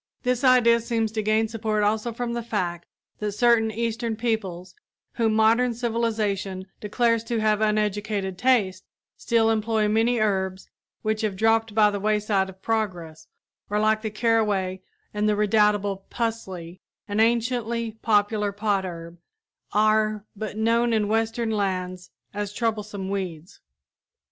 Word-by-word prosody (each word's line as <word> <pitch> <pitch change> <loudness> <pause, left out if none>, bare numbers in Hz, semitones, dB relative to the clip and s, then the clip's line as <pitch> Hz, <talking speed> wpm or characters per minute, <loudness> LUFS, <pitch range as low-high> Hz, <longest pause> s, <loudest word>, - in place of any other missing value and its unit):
This 250 0 0
idea 245 -3 +5
seems 225 -1 -1
to 220 0 -2
gain 215 +1 +2
support 215 -1 -1
also 215 +3 0
from 235 +1 -3
the 235 - -2
fact 180 -7 -3 0.3
that 210 -1 -2
certain 230 0 +3
Eastern 230 +1 -2
peoples, 195 -6 -3 0.4
whom 225 -2 +1
modern 230 +2 +3
civilization 215 -5 -1
declares 230 +2 +1
to 230 -1 -1
have 215 -1 +2
uneducated 210 -2 0
tastes, 200 -5 +1 0.3
still 225 -1 +2
employ 220 -1 +1
many 225 +3 +2
herbs 190 -3 -1 0.3
which 215 0 0
have 215 -3 -1
dropped 225 +1 +2
by 210 -1 +5
the 205 - -3
wayside 210 -2 +1
of 190 +1 -14
progress, 180 -8 -3 0.4
or 210 +1 0
like 215 0 +2
the 220 - -3
caraway 210 -4 0 0.3
and 210 0 +1
the 210 - +2
redoubtable 205 -2 +2
"pusley," 190 -7 -4 0.3
an 205 +1 -2
anciently 235 0 +1
popular 210 -1 +2
potherb, 190 -5 -3 0.5
are 215 0 +2
but 215 0 -5
known 230 +1 +2
in 210 -2 +1
western 225 +1 0
lands 185 -3 -2 0.2
as 205 -1 -3
troublesome 210 -4 -2
weeds. 185 -4 -5
215 Hz, 135 wpm, -25 LUFS, 200-225 Hz, 0.5 s, idea